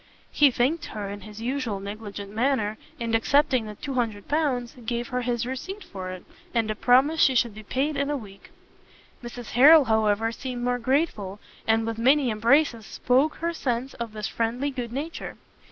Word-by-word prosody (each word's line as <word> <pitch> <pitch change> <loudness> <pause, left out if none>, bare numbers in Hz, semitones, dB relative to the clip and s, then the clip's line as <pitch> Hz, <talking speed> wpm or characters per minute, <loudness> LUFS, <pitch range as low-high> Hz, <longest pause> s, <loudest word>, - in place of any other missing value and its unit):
He 290 -1 +5
thanked 265 +6 0
her 205 -2 -5
in 205 0 -7
his 210 +2 -10
usual 245 -5 -2
negligent 200 0 -7
manner, 220 -3 0 0.2
and 230 -1 -2
accepting 255 0 +3
the 210 - -7
200 235 -6 -3
pounds, 275 -6 0
gave 240 +2 -3
her 250 -1 -1
his 240 -1 -1
receipt 375 +11 -5
for 185 -2 -7
it, 185 -1 -8 0.3
and 225 -2 +1
a - - -3
promise 265 +8 +4
she 265 - +5
should 235 -2 +2
be 215 - -9
paid 270 +8 -1
in 280 0 -1
a 295 - 0
week. 200 -5 -12 0.7
Mrs. 240 -1 -8
Harrel, 290 +4 +8
however, 220 0 +2
seemed 245 0 -5
more 245 0 0
grateful, 230 - -1 0.3
and 225 0 +3
with 225 0 -3
many 265 +1 +4
embraces 230 - +2
spoke 260 - +1
her 335 +1 -2
sense 255 -3 -2
of 235 -2 -6
this 215 -1 -3
friendly 240 +5 -1
good 245 -3 -5
nature. 295 +6 -5
240 Hz, 180 wpm, -25 LUFS, 220-270 Hz, 0.7 s, Harrel